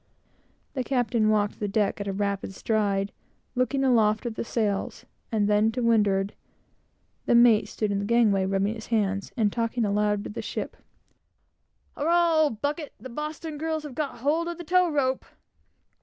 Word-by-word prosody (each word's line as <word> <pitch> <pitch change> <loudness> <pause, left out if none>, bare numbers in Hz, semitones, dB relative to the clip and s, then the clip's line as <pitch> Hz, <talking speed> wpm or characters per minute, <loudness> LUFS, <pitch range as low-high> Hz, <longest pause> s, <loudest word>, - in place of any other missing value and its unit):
The 260 - -2
captain 240 -4 +1
walked 210 -1 +1
the 210 - -1
deck 205 0 0
at 200 - -4
a - - 0
rapid 200 -1 -2
stride, 200 -3 0 0.4
looked 255 +1 0
aloft 235 -5 +3
at 235 - -2
the - - -4
sails, 215 -4 -2 0.3
and 210 -2 +1
then 210 +1 +3
to 250 0 -2
windward; 205 -4 +2 0.9
the - - +4
mate 235 -3 +6
stood 210 -1 -2
in 200 - 0
the 200 - -2
gangway, 210 -4 +3
rubbing 195 +2 0
his 225 -1 -9
hands, 200 -3 0
and 210 -3 +2
talking 230 0 0
aloud 205 0 +1
to - - -6
the 210 - -5
ship - - -5 1.2
"Hurrah, 340 +2 +3
old 225 -7 -3
bucket! 295 +1 -2
the 260 - -9
Boston 300 +3 -5
girls 315 0 -2
have 295 -3 -7
got 280 -3 -4
hold 315 +5 +1
of 345 -1 -4
the 350 - -7
tow 360 +2 +3
rope!" 265 -4 0
225 Hz, 170 wpm, -26 LUFS, 205-275 Hz, 1.2 s, mate